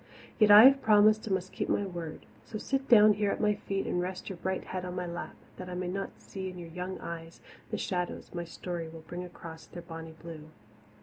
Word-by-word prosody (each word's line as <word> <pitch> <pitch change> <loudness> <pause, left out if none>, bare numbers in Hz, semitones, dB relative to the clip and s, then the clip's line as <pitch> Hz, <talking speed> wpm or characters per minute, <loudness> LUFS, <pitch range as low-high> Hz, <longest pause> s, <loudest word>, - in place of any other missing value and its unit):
Yet 215 -2 +6
I 205 +1 +11
have 275 +1 +8
promised 215 0 +5
and 195 - +2
must 185 0 -5
keep - - -3
my 205 - +1
word. 170 -4 -7 0.2
So 215 - -6
sit 270 +4 -2
down 215 -3 +8
here 205 0 0
at - - -1
my 210 -1 +3
feet 195 -1 -3
and 175 - 0
rest 185 +1 -5
your 190 - -6
bright 190 +2 -2
head 185 -1 -5
on 180 0 -5
my 180 -1 -2
lap, 170 0 -6 0.2
that 185 0 -7
I 180 - -5
may 180 0 -3
not 195 +2 -3
see 190 -1 -6
in 180 - -9
your 170 -1 -8
young 180 +2 -5
eyes 165 -1 -7 0.3
the - - -2
shadows 180 -2 -3
my 175 -1 -3
story 170 0 -5
will 165 0 -10
bring 175 +2 -6
across 165 -2 -10
their 175 - -9
bonny 165 -1 -9
blue. 160 -2 -9
180 Hz, 235 wpm, -30 LUFS, 170-205 Hz, 0.3 s, I